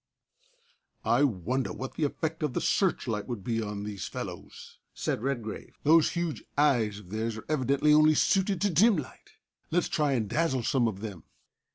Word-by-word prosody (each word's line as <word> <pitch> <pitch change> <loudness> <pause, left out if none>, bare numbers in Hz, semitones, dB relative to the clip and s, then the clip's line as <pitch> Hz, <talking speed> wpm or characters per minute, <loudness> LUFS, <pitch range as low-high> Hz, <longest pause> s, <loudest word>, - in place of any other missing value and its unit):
"I 145 - +3
wonder 125 +2 0
what 130 +1 -6
the 155 - 0
effect 160 +3 -3
of 150 -4 -1
the - - 0
searchlight 120 - 0
would 120 -6 -5
be 115 +2 -1
on 105 -1 -4
these 105 -2 -5
fellows!" - - -8 0.2
said - - -2
Redgrave. 120 -5 -4
"Those 160 +2 +5
huge 170 -3 -2
eyes 120 -8 +3
of 100 -3 -13
theirs 110 +1 -2
are 110 - -9
evidently 145 0 +2
only 155 0 +6
suited 195 +3 +2
to 205 -1 +2
dim 200 +5 +5
light. 145 - -8 0.4
Let's 175 +2 +1
try 150 -3 +1
and 115 -5 0
dazzle 135 -1 0
some 120 0 +2
of 100 -3 -4
them." 100 -7 -7
135 Hz, 175 wpm, -28 LUFS, 110-155 Hz, 0.4 s, only